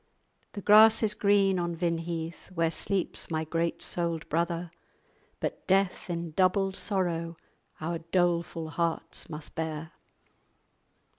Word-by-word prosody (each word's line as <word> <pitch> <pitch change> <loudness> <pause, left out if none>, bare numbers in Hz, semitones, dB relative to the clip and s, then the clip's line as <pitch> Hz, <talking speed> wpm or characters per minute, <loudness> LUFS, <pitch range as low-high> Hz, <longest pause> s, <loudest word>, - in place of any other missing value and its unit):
The 200 - -6
grass 220 +2 +7
is 210 -1 +3
green 200 -3 +3
on 170 -1 -2
Vinheath 165 -1 -3
Where 165 -1 +2
sleeps 195 +1 -2
my 160 -1 -1
great 165 +1 -2
souled 170 -2 -2
brother; 170 +1 -1 0.7
But - - -4
death, 190 +1 +1
in 170 -1 -3
doubled 190 +3 +2
sorrow, 170 -5 0 0.4
Our 165 +2 -3
doleful 170 -1 0
hearts 165 +1 -2
must 150 -1 -7
bear." 160 -1 -4
170 Hz, 120 wpm, -29 LUFS, 165-190 Hz, 0.7 s, grass